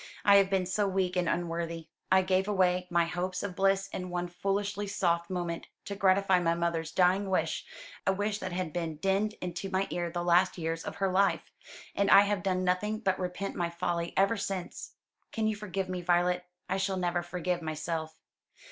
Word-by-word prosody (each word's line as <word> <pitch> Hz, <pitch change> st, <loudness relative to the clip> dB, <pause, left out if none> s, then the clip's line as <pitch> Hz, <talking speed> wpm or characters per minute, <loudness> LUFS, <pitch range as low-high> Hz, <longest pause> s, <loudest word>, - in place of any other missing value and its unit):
"I 200 Hz, -1 st, +8 dB
have 195 Hz, -1 st, +4 dB
been 190 Hz, -2 st, +1 dB
so 200 Hz, +3 st, 0 dB
weak 190 Hz, -1 st, 0 dB
and 180 Hz, -2 st, +1 dB
unworthy. 170 Hz, -1 st, -2 dB, 0.2 s
I 190 Hz, 0 st, +6 dB
gave 185 Hz, +1 st, +1 dB
away 180 Hz, -3 st, +2 dB
my 170 Hz, -1 st, +3 dB
hopes 180 Hz, +2 st, -3 dB
of 195 Hz, -3 st, -4 dB
bliss 195 Hz, 0 st, +2 dB
in 180 Hz, 0 st, -5 dB
one 175 Hz, 0 st, -2 dB
foolishly 200 Hz, +2 st, -2 dB
soft 170 Hz, -3 st, 0 dB
moment, 175 Hz, -2 st, -3 dB, 0.2 s
to 200 Hz, -, -4 dB
gratify 190 Hz, -1 st, +3 dB
my 170 Hz, -1 st, +1 dB
mother's 170 Hz, -2 st, -1 dB
dying 185 Hz, +3 st, +3 dB
wish 165 Hz, -4 st, -1 dB, 0.4 s
a -, -, +5 dB
wish 205 Hz, +2 st, -1 dB
that 185 Hz, -, -4 dB
had 175 Hz, -3 st, -3 dB
been 165 Hz, -3 st, -2 dB
dinned 195 Hz, +5 st, 0 dB
into 180 Hz, +2 st, -4 dB
my 190 Hz, +1 st, +1 dB
ear 175 Hz, -1 st, -2 dB
the 175 Hz, +1 st, -3 dB
last 175 Hz, +2 st, +3 dB
years 165 Hz, -1 st, -3 dB
of -, -, -6 dB
her 195 Hz, -1 st, 0 dB
life 195 Hz, +1 st, +1 dB, 0.4 s
and 200 Hz, 0 st, +1 dB
I 200 Hz, -, +9 dB
have 205 Hz, -1 st, 0 dB
done 185 Hz, -1 st, 0 dB
nothing 185 Hz, +4 st, 0 dB
but 190 Hz, -3 st, 0 dB
repent 180 Hz, +2 st, -3 dB
my 175 Hz, -1 st, -1 dB
folly 170 Hz, 0 st, -2 dB
ever 200 Hz, +4 st, +3 dB
since. 195 Hz, -3 st, -5 dB, 0.4 s
Can 220 Hz, -, -1 dB
you 215 Hz, 0 st, +1 dB
forgive 195 Hz, -2 st, -3 dB
me, 185 Hz, -1 st, -3 dB
Violet? 180 Hz, +1 st, +2 dB, 0.2 s
I 190 Hz, -, 0 dB
shall 195 Hz, 0 st, -1 dB
never 175 Hz, -1 st, 0 dB
forgive 175 Hz, 0 st, -2 dB
myself." 160 Hz, 0 st, -4 dB
185 Hz, 195 wpm, -30 LUFS, 175-195 Hz, 0.4 s, I